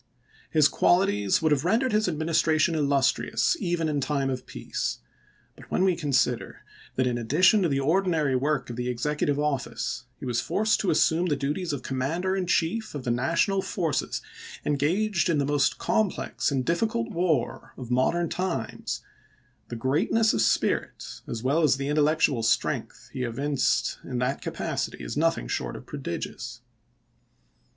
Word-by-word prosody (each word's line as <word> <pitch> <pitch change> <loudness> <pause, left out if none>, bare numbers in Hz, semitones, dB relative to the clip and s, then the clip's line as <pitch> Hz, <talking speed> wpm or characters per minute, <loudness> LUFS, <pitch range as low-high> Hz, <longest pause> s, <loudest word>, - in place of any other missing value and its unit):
His 155 -2 +5
qualities 155 - +2
would 155 - +3
have 145 -1 +2
rendered 230 +8 +2
his 215 -1 +2
adminis 160 -1 +1
tration 160 +1 +2
illustrious 140 - +1
even 170 -2 0
in 145 -2 0
time 135 -1 0
of 130 - -5
peace; - - -3 0.6
but - - -15
when 185 - +1
we 185 -2 +3
consider 135 -6 0 0.3
that 130 - +1
in 120 -1 0
addition 175 - +4
to 175 - +2
the 135 -1 +1
ordinary 160 -3 +2
work 135 -1 0
of 120 - -7
the 125 0 -2
executive 145 +4 -1
office 145 -4 -2
he - - -8
was 120 -2 0
forced 215 +1 +1
to 195 - 0
assume 165 +3 +3
the 150 - +1
duties 150 +6 -2
of 140 -4 -4
Commander 165 +9 -1
in 185 -2 -2
Chief 180 +4 0
of 140 - -5
the 125 - 0
National 165 - +1
forces 165 -8 -2 0.4
engaged 175 +7 +1
in 165 - +2
the 140 - +1
most 145 -1 +1
complex 215 -4 0
and 135 -3 -1
difficult 225 +7 0
war 170 - -1
of 125 -2 -7
modern 165 +7 +2
times, 180 +2 -3 0.6
the 120 - -6
greatness 150 - +2
of - - +1
spirit - - 0
as 115 0 -5
well 140 +6 +2
as 145 -4 +3
the 140 +1 -3
intellectual 150 -3 +2
strength 110 0 -1
he 130 - -4
evinced 135 +4 0
in 125 - -4
that 125 +2 -1
capacity - - -3
is - - -5
nothing - - +1
short - - -3
of - - -9
prodigious. - - -6
150 Hz, 160 wpm, -26 LUFS, 130-175 Hz, 0.6 s, His